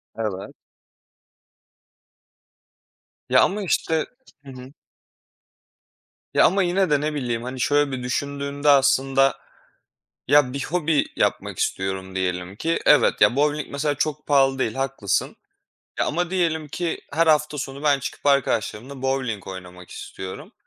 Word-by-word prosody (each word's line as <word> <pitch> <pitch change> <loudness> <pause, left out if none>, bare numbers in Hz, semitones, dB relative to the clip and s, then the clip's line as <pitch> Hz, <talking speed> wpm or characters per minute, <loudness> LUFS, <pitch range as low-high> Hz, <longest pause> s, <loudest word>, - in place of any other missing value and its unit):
Evet. 105 -4 -4 2.7
Ya - - +6
ama 200 +2 +1
işte 160 -3 0 0.4
Hı 135 - -9
hı. 130 +1 -11 1.6
Ya, - - +5
ama 195 +2 +3
yine 185 +1 +1
de, 145 -1 +2
ne 150 0 -1
bileyim, 120 -5 -2
hani, 130 +1 -6
şöyle 145 +1 +2
bir 130 -1 -4
düşündüğümde 140 +2 -2
aslında, 135 -1 +4 0.9
ya, 145 -3 +4
bir 140 - -3
hobi 160 -3 +1
yapmak - - -1
istiyorum 95 0 -2
diyelim 90 0 -2
ki. 165 +9 -1
Evet 150 - +4
ya, 125 - +5
bovling 150 +1 +1
mesela 145 +1 -1
çok 150 +1 -2
pahalı 135 -2 +3
değil, 110 -4 0
haklısın. 135 -7 -1 0.6
Ya, - - +1
ama 175 +3 -1
diyelim 160 -4 0
ki 170 +2 -3
her 165 +3 +2
hafta 150 -1 +2
sonu 135 +1 -6
ben 145 -2 +3
çıkıp 135 - -6
arkadaşlarımla 130 -1 0
bovling 130 -7 -2
oynamak 90 -1 -10
istiyorum. 95 0 -8
140 Hz, 130 wpm, -23 LUFS, 125-150 Hz, 2.7 s, Ya